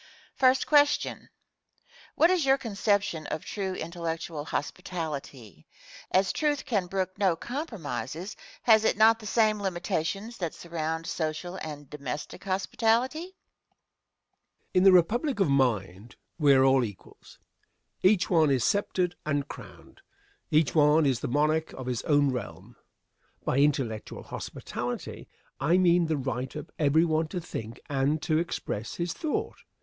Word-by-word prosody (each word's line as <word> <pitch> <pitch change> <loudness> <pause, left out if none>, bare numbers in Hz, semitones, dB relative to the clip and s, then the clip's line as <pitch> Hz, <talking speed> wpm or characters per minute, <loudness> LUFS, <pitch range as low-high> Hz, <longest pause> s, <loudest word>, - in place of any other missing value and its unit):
] - - -31 0.3
Question. 290 -1 +2 0.9
What 330 +3 +5
is 365 -4 +2
your 270 0 +4
conception 205 - -1
of - - -4
true 190 -3 -3
intellectual 165 -2 -4
hospitality? 145 - -5 0.4
As 190 0 +2
Truth 295 -2 0
can 200 -7 0
brook 185 +1 -3
no 190 -4 +3
compromises, 175 - -5 0.3
has 220 -2 +6
it 220 - +2
not 225 +1 +6
the 215 - -8
same 215 -1 +2
limitations 195 +4 -3
that 170 -4 -3
surround 160 -1 -4
social 165 +3 -3
and 145 -4 -7
domestic 140 0 -6
hospitality? 225 +8 +1
Answer. 360 +3 -8 1.4
In 185 - +4
the 195 - +9
republic 220 - +3
of 185 -8 +3
mind 115 -5 0 0.2
we 145 -3 +6
are 130 0 +5
all 135 -1 +4
equals. 105 -5 -10 0.6
Each 190 0 +4
one 160 -4 +4
is 130 -4 +2
sceptered 185 -3 +1
and 145 -1 -1
crowned. - - -12 0.5
Each 155 -6 +3
one 150 +1 +5
is 130 -4 +2
the - - -3
monarch 155 +4 +1
of 130 - -7
his 125 -2 -2
own 145 -2 +3
realm. 125 -5 -7 0.7
By 130 - +1
"intellectual 135 -7 0
hospitality" 120 0 -6 0.3
I 175 +3 +3
mean 175 -2 +4
the 155 -1 0
right 130 -1 -3
of 150 +1 -7
every 155 +2 +4
one 160 -1 +1
to 180 - -4
think 115 -9 -7
and 140 +2 +1
to 155 -1 +2
express 120 -9 -4
his 170 -1 -2
thought. 310 -2 -3
165 Hz, 140 wpm, -28 LUFS, 140-195 Hz, 1.4 s, the